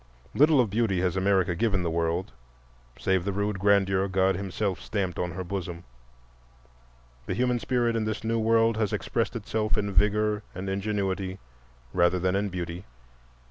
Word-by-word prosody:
Little 150 0 +5
of 115 -5 +2
beauty 105 -4 +1
has 90 -1 0
America 95 -2 +2
given 100 0 0
the 85 - -1
world 85 +4 -1 0.7
save 95 -2 +1
the 100 - -1
rude 100 0 -1
grandeur 95 -1 +3
God 95 0 +2
himself 95 0 -2
stamped 95 -4 -2
on 90 -1 -2
her 95 +2 -4
bosom; 90 -2 -5 1.4
the - - -1
human 125 0 +1
spirit 120 -1 0
in 110 -1 0
this 110 0 -3
new 115 0 0
world 115 0 +3
has 110 -3 0
expressed - - -1
itself 110 0 -1
in 100 -1 -1
vigor 105 +2 +2
and 95 +2 -5
ingenuity 95 -1 -2 0.6
rather 85 +1 +3
than 90 +1 0
in 100 +1 0
beauty. 90 0 -5
100 Hz, 160 wpm, -27 LUFS, 95-110 Hz, 1.4 s, Little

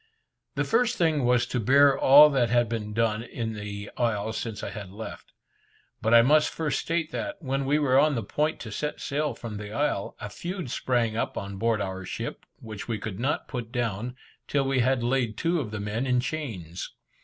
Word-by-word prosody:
The - - +1
first 235 0 +2
thing 155 -6 +2
was 120 0 +3
to 125 - -2
bear 140 +4 +5
all 145 +3 +8
that 125 -4 +2
had 120 0 +3
been 110 -2 -4
done 110 0 +1
in 115 -1 -4
the 105 -1 -6
isle 110 -2 0
since 110 -2 -4
I - - -4
had 100 -3 -7
left 105 +4 -8
it. - - -32 0.7
But 110 - +1
I 115 0 +8
must 150 +4 +4
first 155 -2 -1
state 165 -1 -1
that, 300 0 -4
when 135 -1 -2
we 145 +2 +3
were 135 -3 +4
on 150 -1 +3
the 115 - -2
point 150 +9 -1
to 110 - -7
set 150 +8 -3
sail 145 -2 -1
from 110 -3 -7
the 105 0 -7
isle, 115 -5 -1
a - - -5
feud 175 - -5
sprang 120 -4 0
up 115 - -2
on 100 0 -5
board 115 +1 +1
our 95 0 -4
ship, - - -6
which 110 -3 -8
we 115 -2 -1
could 105 -1 -6
not 135 +5 -1
put 120 -4 -5
down, 120 0 -2 0.3
till 140 -1 +1
we 135 -1 +1
had 125 0 +2
laid 120 -3 0
two 170 +1 +1
of 125 -8 -3
the 110 0 -5
men 105 +5 -2
in 125 -1 +3
chains. 120 - -5
120 Hz, 210 wpm, -27 LUFS, 110-140 Hz, 0.7 s, all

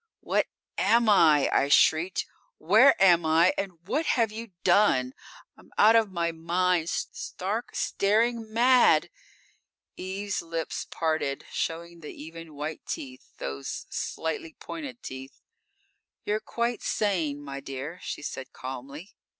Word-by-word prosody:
"What - - +1 0.3
am 235 0 +3
I?" 155 -9 +5
I 140 - +3
shrieked. 160 +5 +3 0.3
"Where 220 - +5
am 175 -3 +6
I 160 +3 +4
and 180 -4 -5
what 315 +8 0
have 230 -3 +2
You 225 +1 -7
done? 175 -10 +3 0.4
I'm - - -20
out 220 +2 +6
of 220 -3 +3
my 170 -2 -1
mind; 170 +1 0
stark, 210 +6 -4
staring 225 +2 +1
mad!" 245 +2 +4 0.9
Eve's 195 +2 -3
lips 165 -1 -4
parted, 155 -4 -1
showing 170 +1 -4
the 150 - -10
even 160 0 -10
white 150 +2 -5
teeth 130 -2 -7
those 70 0 -5
slightly 160 0 -4
pointed 280 -7 -8
teeth. 130 +1 -8 0.9
_"You're 210 +1 0
quite 235 +1 -2
sane, 170 -9 0
my 140 -1 -7
dear," 135 +5 -7
She - - -6
said 130 -2 -6
calmly. 135 +7 -8
170 Hz, 125 wpm, -27 LUFS, 155-210 Hz, 0.9 s, am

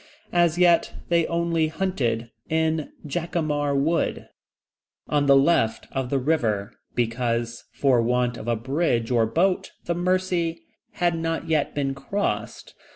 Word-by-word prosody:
As 175 -1 +3
yet, 175 -2 +4
they 170 -1 +3
only 170 -1 +1
hunted 130 -10 -2 0.2
in 160 -1 0
Jacamar 150 -3 -1
Wood, 160 +5 0 0.8
on 145 -1 +1
the 140 - +7
left 135 -6 +3
of 130 -2 -2
the 140 - +1
river, 120 -7 0 0.2
because, 120 0 -1
for 130 -4 +3
want 125 +1 +1
of 115 - -8
a 120 - +2
bridge 125 -1 0
or 115 -2 +3
boat, 180 - +1
the 170 - 0
Mercy 175 -1 0 0.3
had 175 -1 +1
not 165 0 -2
yet 155 -3 0
been 140 -2 0
crossed. 135 +10 -3
150 Hz, 135 wpm, -24 LUFS, 120-170 Hz, 0.8 s, the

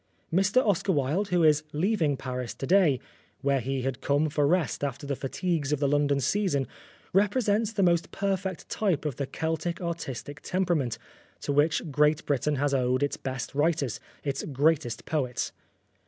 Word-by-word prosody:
Mr 195 +8 +3
Oscar 195 0 +2
Wilde, 155 +6 +1
who 180 -3 +2
is 150 -1 +5
leaving 160 -3 +1
Paris 125 -2 -4
to - - -5
day, 170 -6 +4 0.4
where 140 0 +2
he 130 +1 -2
had 130 -1 -3
come 145 +2 +2
for 145 -1 +2
rest 165 -3 +1
after 140 0 -3
the 140 0 -1
fatigues 150 +2 -2
of 150 - +1
the 140 - +2
London 145 0 +2
season, 145 - +1 0.5
represents 210 +2 +2
the 200 -3 +1
most 170 -2 +2
perfect 190 -2 -2
type 190 -8 0
of 145 -5 -2
the 140 - -2
Celtic 160 +3 -2
artistic 145 -4 -5
temperament, 170 -11 0 0.4
to - - -2
which 150 +2 +2
Great 150 +2 +3
Britain 145 +1 +1
has 140 +1 0
owed 130 0 +2
its 145 - 0
best 130 -2 -5
writers, 145 -3 +1 0.2
its 140 -1 -2
greatest 140 -3 +1
poets. 130 -6 -1
150 Hz, 165 wpm, -28 LUFS, 140-180 Hz, 0.5 s, is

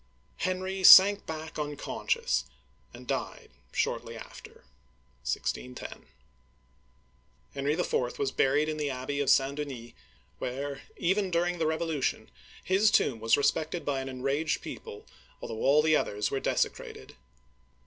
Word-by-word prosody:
Henry 185 +1 -2
sank 200 +2 +9
back 160 0 -6
unconscious, 145 - -1 0.5
and - - -12
died - - -4 0.2
shortly - - -2
after - - -12 0.6
(16 65 0 -3
10). - - -9 1.5
Henry 140 +1 -1
IV. 130 -7 -1
was 135 -1 -1
buried 145 +3 +2
in 155 0 -3
the 150 -1 -1
Abbey 135 +2 -4
of 140 - 0
St. 135 +1 +3
Denis, 130 -6 -6 0.5
where, 140 +2 -4 0.2
even 190 +2 +1
during 175 0 0
the 160 - +1
Revolution, 160 -3 -2 0.3
his 195 +3 +3
tomb 130 - +2
was 115 +1 +3
respected 155 +4 0
by 140 -2 -1
an 135 0 -5
enraged 135 +4 -1
people, 450 -1 -9 0.3
although 110 -1 -6
all 150 +2 +4
the 155 0 +4
others 105 -7 -1
were 135 - -1
desecrated. - - -3
145 Hz, 130 wpm, -29 LUFS, 135-170 Hz, 1.5 s, sank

